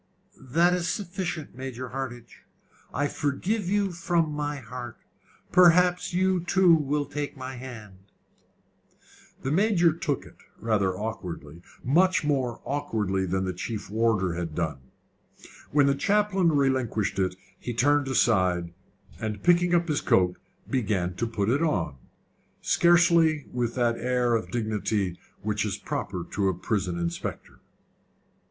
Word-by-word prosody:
"That 170 +7 +2
is 175 -1 -1
sufficient, 180 -5 -4
Major 130 -1 -6
Hardinge. 120 -2 -7 0.5
I 145 +2 0
forgive 175 +9 -1
you 200 -1 +1
from 170 -2 0
my 145 0 -2
heart. 125 -2 -8 0.5
Perhaps 180 0 +5
you 185 +1 +2
too 180 0 +5
will 150 -2 +1
take 145 +1 -5
my 130 0 -6
hand." 110 -7 -9 1.4
The 135 - -1
Major 175 -2 +3
took 155 -4 -2
it - - -16 0.2
rather 100 -4 0
awkwardly 90 -7 -6 0.2
much 180 +7 +3
more 135 -5 -1
awkwardly 105 -10 -1
than 95 +1 -1
the 95 - -2
chief 100 +3 -5
warder 110 -5 +1
had 85 -2 -4
done. 80 -5 -2 0.9
When 145 -1 +4
the 140 - +4
chaplain 195 +2 +2
relinquished 130 -8 0
it, 95 -1 0 0.2
he 120 - -4
turned 145 +3 +3
aside, 95 -9 +2 0.5
and 110 -1 -4
picking 175 0 +4
up 170 0 +2
his 150 -3 0
coat, 90 -1 +3 0.3
began 100 -8 0
to 105 +6 -2
put 105 -3 -2
it 135 +7 +2
on 90 - 0 0.6
scarcely 170 -3 +4
with 120 -1 -1
that 120 -2 +1
air 125 -1 +1
of 115 -1 -1
dignity 105 -5 -1 0.2
which - - 0
is - - -2
proper - - -4
to 100 -1 0
a 95 - -1
prison 90 -2 -2
inspector. 85 0 -5
130 Hz, 135 wpm, -26 LUFS, 105-165 Hz, 1.4 s, Perhaps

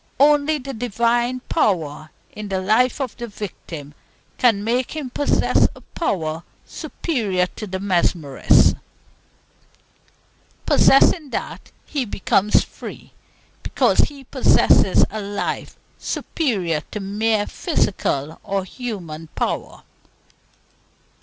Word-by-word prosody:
Only 295 +2 +4
the 275 -1 -7
Divine 240 +2 0
power 160 - -1 0.2
in 210 0 -7
the 190 -1 -1
life 220 +8 +2
of 260 -5 -3
the 240 -1 -5
victim 175 -8 -8 0.5
can 225 -5 +3
make 245 +6 -1
him 285 -5 -5
possess 290 - +2
a - - -14
power 160 - -2 0.2
superior 210 - -2
to 215 - -5
the 190 0 -4
mesmerist's. 175 -7 +3 1.9
Possessing 290 +2 +5
that, - - -5
he 280 -4 -2
becomes 200 0 +2
free, - - -10 0.5
because - - +1
he 280 -2 +1
possesses - - +4
a 215 - -4
life 200 0 -4 0.2
superior 190 - -1
to 210 - -5
mere 210 +2 0
physical 160 - -1
or 195 -1 -1
human 185 -8 -6
power. - - -3
215 Hz, 105 wpm, -21 LUFS, 185-255 Hz, 1.9 s, Possessing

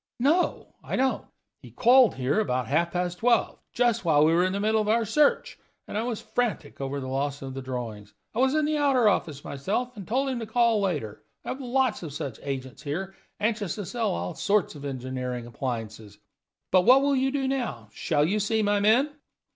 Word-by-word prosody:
"No, 310 +8 +1
I - - -3
don't. 265 +1 0 0.3
He - - -12
called 250 0 +5
here 135 +7 0
about 130 - 0
half 170 +4 +1
past 180 0 -2
twelve, 235 0 +2
just 235 -2 +1
while 155 -3 +4
we 160 - +4
were 175 +2 +4
in 185 - +1
the 200 - -1
middle 215 +1 +2
of 210 - -3
our 230 +1 +3
search 290 +7 +2 0.3
and - - -7
I 215 - +1
was 230 -2 -3
frantic 245 - -3
over 135 +1 -3
the 130 - -6
loss 140 +2 -2
of 135 -1 -6
the 135 - -5
drawings. 115 -6 -6 0.2
I 225 - -3
was 265 +3 +3
in 310 -1 +2
the 305 0 0
outer 270 -6 +3
office 155 -8 0
myself, 215 - -3
and 200 -4 -9
told 270 +4 0
him 255 -2 -2
to 225 - -5
call 230 -1 +2
later. 145 - -2 0.2
I - - -5
have 270 - -4
lots 260 -1 0
of 160 -5 -7
such 135 -5 -5
agents 130 -2 -5
here, 175 +7 -4 0.3
anxious 215 -3 -1
to 205 - -5
sell 235 +4 -1
all 85 +1 -3
sorts 205 -2 +1
of 145 -2 -9
engineering 125 -2 -4
appliances. 110 -4 -5 0.5
But 185 - +6
what 255 +7 +6
will 280 0 +2
you 265 0 +2
do 270 -1 -1
now? 235 - -3
Shall 145 +7 +1
you 205 +6 0
see 215 +2 +1
my 205 0 +2
men?" 235 +8 +3
200 Hz, 210 wpm, -26 LUFS, -, 0.5 s, But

